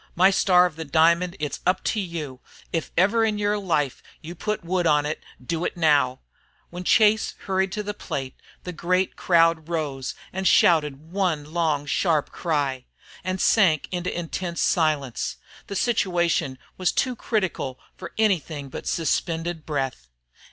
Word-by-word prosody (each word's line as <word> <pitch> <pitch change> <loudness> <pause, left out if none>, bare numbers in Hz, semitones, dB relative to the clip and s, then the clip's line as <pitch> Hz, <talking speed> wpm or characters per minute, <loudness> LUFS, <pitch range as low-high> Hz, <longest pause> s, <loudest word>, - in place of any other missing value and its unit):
My 185 +3 +5
Star 180 -2 +5
of 170 -3 -4
the 165 - -4
Diamond, 170 +4 +3
it's 150 -1 -3
up 185 +1 +1
to 220 - 0
you. 160 -9 -5 0.3
If 165 - -1
ever 205 +6 +4
in 215 -2 +1
yer 205 0 0
life 155 -9 -1 0.2
you 170 +1 -8
put 210 +5 -3
the - - -14
wood 180 -1 +1
on 150 -1 +3 0.4
do 165 +5 -2
it - - -3
now!" 145 -5 +3 0.5
When 175 +1 -6
Chase 215 +3 +3
hurried 190 0 +1
up - - -10
to 210 - -2
the 205 0 -4
plate, 135 -9 -5 0.3
the 180 - -5
great 185 +3 0
crowd 165 -2 +3
rose 145 -6 -3 0.2
and 190 +1 -1
shouted 155 -2 +3
one 165 -6 -1
long 155 -4 +1
sharp 155 0 +1
cry, 140 -6 -1 0.4
and 185 0 -2
sank 180 -10 +3
into 180 0 -2
intense 170 0 -4
silence. 150 -7 0 0.3
The 200 - -5
situation 175 - +1 0.2
was 185 - +2
too 255 -2 0
critical 190 - -2 0.2
for 170 - -8
anything 165 -9 0
but - - -7
suspended 165 0 -1
breath. 135 - -3
170 Hz, 160 wpm, -24 LUFS, 150-185 Hz, 0.5 s, My